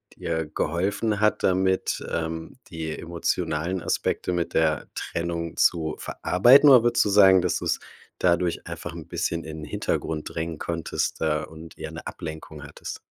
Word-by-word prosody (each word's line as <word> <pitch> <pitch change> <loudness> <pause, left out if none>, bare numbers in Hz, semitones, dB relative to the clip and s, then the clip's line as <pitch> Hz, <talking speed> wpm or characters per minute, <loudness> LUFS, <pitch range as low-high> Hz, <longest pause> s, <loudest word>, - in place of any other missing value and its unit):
dir 80 -1 -2
geholfen 95 +8 -1
hat 105 0 +2
damit, 95 0 +1
ähm, 80 0 -4
die 80 -2 -5
emotionalen 85 +1 -2
Aspekte 90 - -1
mit 85 -1 -2
der 80 -2 +2
Trennung 85 -1 -3
zu 80 -3 +2
verarbeiten, 130 +11 +5
oder 130 -4 +9
würdest 120 0 +3
du 105 - +1
sagen, 95 -2 +7
dass 90 -1 0
du's - - -1 0.4
dadurch 85 -1 +1
einfach - - -6
'n - - -9
bisschen 85 -1 -2
in 80 0 -7
den - - -5
Hintergrund 75 -1 -2
drängen 80 -1 -3
konntest, 85 -2 -2
äh, 75 0 +1
und 80 +1 -12
eher - - -6
'ne - - -9
Ablenkung 80 -1 -7
hattest? - - -8
85 Hz, 155 wpm, -25 LUFS, 80-95 Hz, 0.4 s, oder